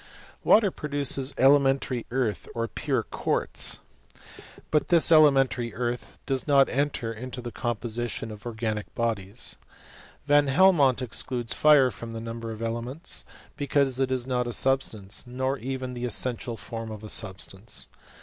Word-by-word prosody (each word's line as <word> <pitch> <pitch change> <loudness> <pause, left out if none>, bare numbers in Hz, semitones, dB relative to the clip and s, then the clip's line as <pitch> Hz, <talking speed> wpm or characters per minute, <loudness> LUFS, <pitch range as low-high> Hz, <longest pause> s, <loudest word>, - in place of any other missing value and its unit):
Water 210 -3 +5
produces 140 -3 0
elementary 135 -2 +3
earth, 115 -7 -2
or 115 0 -1
pure - - -2
quaitz; - - 0 0.9
"but 150 - +2
this 170 -1 +5
elementary 135 -7 +4
earth 120 +1 -4
does 135 0 -2
not 140 -2 +5
enter 135 -4 -1
into 125 +3 -7
the 120 -1 -6
com 120 0 -2
position 120 0 -4
of 105 +2 -9
organic 110 -2 -4
bodies. 105 -4 -1 0.7
Van 145 0 +4
Helmont 140 -4 +4
excludes 120 0 -2
fire 145 -4 +5
from 115 0 -8
the 115 - -5
number 115 0 -6
of 110 0 -6
elements, 120 +8 -3 0.3
because 140 -2 +1
it 130 -1 0
is 130 -2 0
not 125 -2 -1
a 120 - -2
substance, 110 -7 0
nor 130 +2 -2
even 130 +1 -4
the 120 0 -4
essential 120 0 -1
form 115 0 -7
of 110 -1 -8
a - - -7
substance. 95 0 -2
125 Hz, 145 wpm, -26 LUFS, 115-135 Hz, 0.9 s, Water